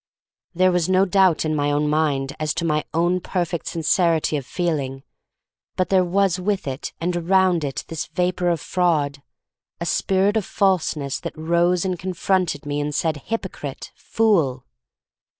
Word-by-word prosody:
There 185 +1 +4
was 180 -1 +1
no 190 +1 +4
doubt 185 -4 +3
in 155 0 0
my 145 -1 +1
own 145 +1 +1
mind 145 -3 0
as 155 -1 -1
to 170 - -1
my 150 -2 +1
own 175 +3 +1
perfect 175 -2 -2
sincerity 165 -1 +1
of 140 -4 -4
feeling, 140 -7 -2 0.7
but 185 - 0
there 190 -1 +4
was 185 0 +1
with 195 +1 -1
it 135 -1 -4
and 175 +2 -1
around 180 -1 +2
it 135 -5 -4
this 165 -2 -4
vapor 180 +1 0
of 170 -2 0
fraud, 150 -7 0 0.6
a 170 - -3
spirit 195 +4 +1
of 215 - 0
falseness 170 -9 0
that - - -7
rose 170 +3 +1
and 185 -2 -2
con 185 +2 -4
fronted 175 -5 0
me 145 0 -2
and 145 0 -3
said, 160 -2 0
"hypocrite," 190 -11 -5
"fool." 160 - +1
170 Hz, 165 wpm, -22 LUFS, 150-185 Hz, 0.7 s, There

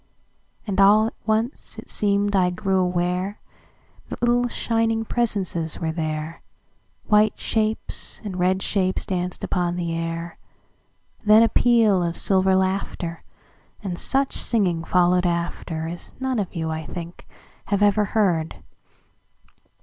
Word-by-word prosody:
And 200 -3 +1
all 210 +2 +6
at 225 - -3
once 220 +5 -1
it - - -9
seem'd 205 0 +1
I 180 -2 +3
grew 190 +1 0
awareThat 180 +3 -1 0.8
little, 240 0 +2
shining 225 -1 0
presences 195 -9 -1
were 160 -1 -1
there,—White 160 +6 -2
shapes 220 0 -2
and 190 -4 -5
red 185 +1 +1
shapes 190 -2 0
danced 180 -1 -3
upon 175 -2 -1
the 170 -2 -2
air; 165 0 -4 0.8
Then 215 +1 +7
a 230 - +3
peal 225 -6 +4
of 170 -1 -2
silver 190 -1 +3
laughter, 190 -3 -2 0.6
And 180 -3 -4
such 270 0 +1
singing 185 -8 +1
followed 180 +1 +2
afterAs 170 -1 -4
none 260 -2 -1
of 195 -3 -4
you, 160 -1 -2
I 160 0 -4
think, 170 +5 -8 0.4
have 200 0 +1
ever 205 +1 +3
heard. 180 -7 0
190 Hz, 125 wpm, -23 LUFS, 175-215 Hz, 0.8 s, Then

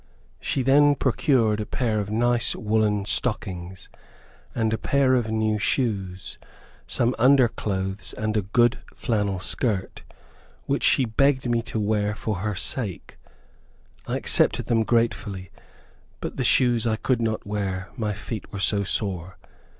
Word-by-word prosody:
She 135 - -1
then 145 +2 +5
procured 120 -4 +2
a 105 - -2
pair 110 -4 -1
of 100 -1 -3
nice 120 +2 +1
woollen 105 -2 0
stockings, 95 -6 -2 0.7
and 110 -2 0
a - - 0
pair 140 -2 +2
of 120 -3 +1
new 110 -1 0
shoes, 100 -6 -1 0.5
some 120 +1 0
under 130 +1 +6
clothes, 95 -3 -3
and 110 0 -2
a 105 - +2
good 120 +5 +2 0.2
flannel 105 -6 -1
skirt, 100 0 -2 0.6
which - - -1
she 130 - +4
begged 130 +3 +1
me 120 -1 +1
to 110 - -2
wear 105 0 0
for 110 -2 -3
her 105 +2 -2
sake. 100 +1 -4 0.9
I - - -1
accepted - - +3
them 115 -1 +2
gratefully, 110 -5 -1 0.7
but - - -5
the - - -1
shoes 120 -2 +3
I 110 - +1
could 120 +2 0
not 110 -1 -1
wear, 95 -3 -3
my 110 -4 -2
feet 105 +2 -7
were - - -6
so 100 +1 +2
sore. 95 -3 -2
110 Hz, 145 wpm, -24 LUFS, 100-120 Hz, 0.9 s, under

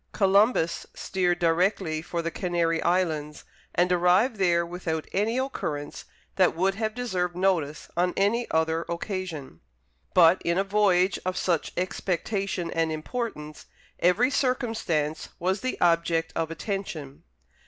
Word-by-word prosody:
Columbus 200 -3 +2
steered 180 -2 0
directly 170 -1 +1
for 170 +1 -4
the 165 - -2
Canary 170 -3 0
Islands, 160 -4 0 0.3
and 180 +1 +2
arrived 180 +7 +3
there 170 -3 +2
without 170 -2 -4
any 215 +5 +1
occurrence 155 - -4 0.3
that 185 -3 +4
would 190 +3 +1
have 215 +1 -3
deserved 185 -8 -2
notice 175 -6 0
on 180 +1 +1
any 225 +5 +1
other 160 0 +1
occasion. 170 - -5 0.5
But, 175 +1 +6
in 170 +1 0
a 195 - +3
voyage 195 -2 +2
of 185 0 -2
such 170 -4 0
expectation 185 0 -2
and 165 -1 0
importance, 155 -2 -5 0.3
every 215 +9 +3
circumstance 225 - -1
was 190 +3 -1
the 255 - -3
object 165 -1 +2
of 165 -1 -1
attention. 165 -6 -5
180 Hz, 130 wpm, -26 LUFS, 165-195 Hz, 0.5 s, But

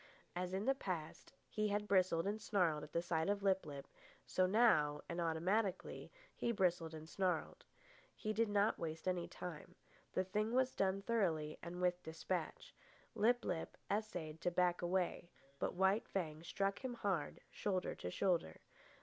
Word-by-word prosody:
As 180 0 -2
in 190 +3 -1
the 270 - +4
past 180 -11 -5 0.2
he 215 0 0
had 205 0 0
bristled 185 -4 +3
and 210 +2 -1
snarled 175 -8 +2
at 170 +3 -2
sight 165 +1 0
of 200 -1 0
Lip 190 -3 +2
lip, 140 -2 -7 0.4
so 185 0 +2
now, 170 -9 +4
and 170 0 -2
automatically, 180 +5 0 0.2
he 235 - 0
bristled 175 -6 +1
and 155 0 -8
snarled. 180 -2 -1 0.5
He 215 -1 -2
did 225 +1 +2
not 205 +1 +3
waste 160 +1 -4
any 180 -2 0
time. 175 0 -7 0.4
The 185 - +2
thing 210 +4 -1
was 255 0 +3
done 195 0 +1
thoroughly 165 -10 0
and 175 +1 -6
with 180 0 +2
despatch. 160 +1 -4 0.4
Lip 240 +2 +3
lip 170 -3 -3
essayed 175 -7 -2
to 175 - +2
back 175 0 +2
away, 175 -1 0 0.3
but - - -1
White 190 +4 +3
Fang 160 -5 -2
struck 195 +3 -1
him 255 -2 -3
hard, 190 -10 -1
shoulder 190 -3 -1
to 90 - -5
shoulder. 170 - 0
185 Hz, 160 wpm, -39 LUFS, 165-205 Hz, 0.5 s, the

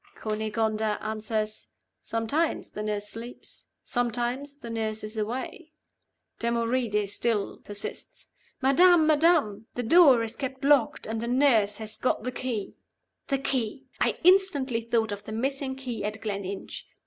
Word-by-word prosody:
Cunegonda 215 0 -1
answers, 215 0 -3 0.3
'Sometimes 230 +9 -1
the 210 - -5
nurse 210 -1 -2
sleeps; 230 +3 -8 0.2
sometimes 245 +3 -2
the 240 -5 -9
nurse 220 -1 -2
is 215 +1 -6
away.' 245 +9 -4 0.7
Damoride 230 -2 0
still 210 0 -1
persists. 205 -1 -6 0.3
'Madam! 330 +5 +6
madam! 300 -9 +3
the 245 - -2
door 270 -3 +6
is 225 - -4
kept 265 -1 -5
locked, 280 -3 +3
and 220 0 -3
the 235 - -3
nurse 235 -6 +3
has 215 0 -6
got 255 - 0
the 255 - -2
key.'" 245 -5 -4 0.5
The 275 - +1
key! 265 -2 -2
I - - +1
instantly 315 -10 +4
thought 225 -1 0
of 205 0 -6
the - - -7
missing 265 +4 -2
key 255 -5 -5
at 210 +1 -3
Gleninch. 200 -2 -5
230 Hz, 135 wpm, -27 LUFS, 215-265 Hz, 0.7 s, Madam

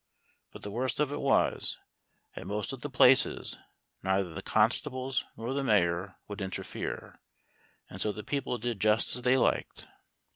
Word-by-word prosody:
But - - -12
the 100 - -5
worst 125 +3 -1
of 150 -2 +1
it - - -3
was, 135 -1 +2 0.6
at - - -7
most 105 +6 -3
of 130 - -8
the 145 - -4
places, 130 0 +4 0.4
neither 95 -2 0
the - - -5
constables 130 +4 +1
nor 115 +4 -3
the 140 0 -1
mayor 95 -5 +2
would 105 0 -6
interfere, 95 -1 -5 0.7
and - - -8
so 105 - +1
the 105 +1 -7
people 135 +1 -2
did 120 -3 -3
just 110 +2 +3
as 125 - -3
they 125 +2 +4
liked. - - 0
115 Hz, 160 wpm, -30 LUFS, 100-130 Hz, 0.7 s, places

